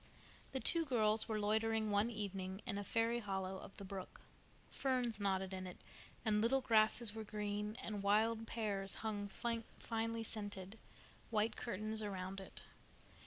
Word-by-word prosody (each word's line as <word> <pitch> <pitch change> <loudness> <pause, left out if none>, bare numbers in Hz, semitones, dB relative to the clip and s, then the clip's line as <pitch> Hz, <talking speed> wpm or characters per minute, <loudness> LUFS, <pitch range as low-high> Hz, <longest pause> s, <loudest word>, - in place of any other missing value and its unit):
The 265 - 0
two 335 +5 +3
girls 220 -6 +3
were 215 -1 +1
loitering 220 +1 +2
one 205 +3 +3
evening 195 -3 -4
in 205 -5 -1
a - - -2
fairy 230 +3 +2
hollow 190 -3 -2
of 195 - -11
the 200 - -6
brook. 190 -1 -6 0.5
Ferns 250 -5 +1
nodded 190 -1 +1
in 185 0 -3
it, 180 - -8 0.5
and 210 -1 +4
little 250 +4 +4
grasses 225 -2 +4
were 220 0 -4
green, 210 +1 -2
and 210 -2 -2
wild 220 +3 +3
pears 200 -4 0
hung 205 -2 -1
finely 230 0 -2
scented, 205 -1 -5 0.5
white 215 0 +2
curtains 215 -1 -2
around 195 -2 -3
it. 190 - -9
215 Hz, 150 wpm, -39 LUFS, 200-225 Hz, 0.5 s, and